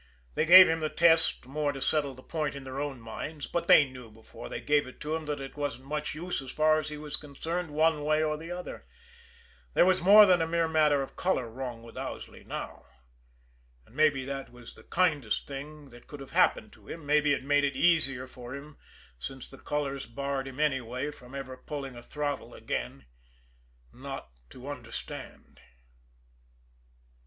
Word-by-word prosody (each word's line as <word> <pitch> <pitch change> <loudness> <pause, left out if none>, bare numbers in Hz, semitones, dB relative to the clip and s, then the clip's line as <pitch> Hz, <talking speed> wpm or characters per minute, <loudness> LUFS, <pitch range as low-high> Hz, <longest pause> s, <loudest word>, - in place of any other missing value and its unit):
They 160 - 0
gave 185 +2 +11
him 165 0 +1
the 155 -1 -1
test 165 -3 +4
more 145 +2 -1
to 140 - -7
settle 140 0 0
the 130 - -14
point 155 -4 -2
in 140 - -7
their 130 +1 -6
own 145 -3 -3
minds, 145 +7 -6
but 170 - -2
they 145 - +8
knew 125 -3 -11
before 110 - -11
they - - -4
gave 145 -2 +2
it 130 - -12
to 150 +1 -2
him 160 -2 -5
that 145 -1 -2
it 135 0 -8
wasn't 145 -4 -3
much 150 +1 -3
use 175 0 -3
as 135 -1 -7
far 155 0 +3
as 155 0 -5
he 150 - -6
was 150 0 -5
concerned 160 +4 -4
one 155 0 +2
way 155 +1 +2
or 155 -1 0
the 160 +2 -8
other. 180 0 -7 0.9
There - - +6
was 185 0 +3
more 205 +4 +9
than 180 -3 +4
a 165 - +1
mere 165 0 +1
matter 150 -3 +3
of - - -10
color 180 -10 0
wrong 120 -2 -6
with 115 - -10
Owsley - - -7
now. - - -7 1.0
And 120 - -21
maybe 145 -3 +3
that 135 0 -5
was 125 -1 -12
the - - -13
kindest 150 -11 +1
thing 145 +1 -8
that 120 0 -15
could 145 - -9
have 135 - -10
happened - - +2
to - - -19
him, 165 -3 -8
maybe 150 0 +3
it 140 - -2
made 145 +1 +3
it 140 -1 0
easier 135 -4 +3
for 125 0 -9
him 145 +1 -11 0.4
since 130 - -7
the 135 - -12
colors 140 -2 -3
barred 140 +2 -3
him 135 +1 -9
anyway 130 -1 0
from 130 -2 -13
ever 135 -1 -6
pulling 135 -2 -6
a 120 - -9
throttle 145 +3 -4
again 65 +2 -4 0.9
not 135 - -8 0.2
to 130 +2 -11
understand! 125 -6 -8
145 Hz, 190 wpm, -29 LUFS, 130-155 Hz, 1.0 s, gave